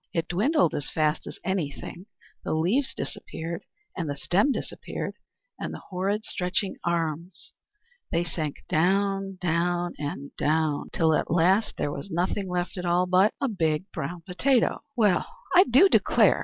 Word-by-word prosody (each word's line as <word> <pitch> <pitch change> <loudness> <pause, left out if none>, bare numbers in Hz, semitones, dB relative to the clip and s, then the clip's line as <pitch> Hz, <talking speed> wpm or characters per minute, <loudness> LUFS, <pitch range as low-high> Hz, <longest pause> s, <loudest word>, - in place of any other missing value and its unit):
It 165 -1 0
dwindled 255 - +2
as 145 - -3
fast 155 -1 0
as - - -7
anything, 175 0 -3 0.4
the - - -1
leaves 205 - +1
disappeared, 165 +1 -5 0.3
and 165 -5 -3
the 145 - -2
stem 175 - +2
disappeared - - -4 0.5
and - - -3
all - - -6
the - - -18
horrid 200 +3 -1
stretching 180 +2 -1
arms. 170 0 -2 0.6
They 170 +1 +2
sank 155 -3 -4
down, 195 +3 +1
down, 175 0 0
and 145 -1 -5
down, 155 -1 +1
till 160 -1 +3
at - - 0
last 180 +6 +3
there 145 - -1
was 145 +7 -6
nothing 185 +3 -1
left 180 +1 -2
at 180 - -4
all 175 +1 +3
but 185 +3 +4
a 275 - +1
big 170 -4 -1
brown 175 0 -4
potato! 230 +9 +1
"Well, 210 -7 +3 0.3
I 365 - +8
do 265 +11 +6
declare!" - - +4
175 Hz, 155 wpm, -26 LUFS, 160-195 Hz, 0.6 s, I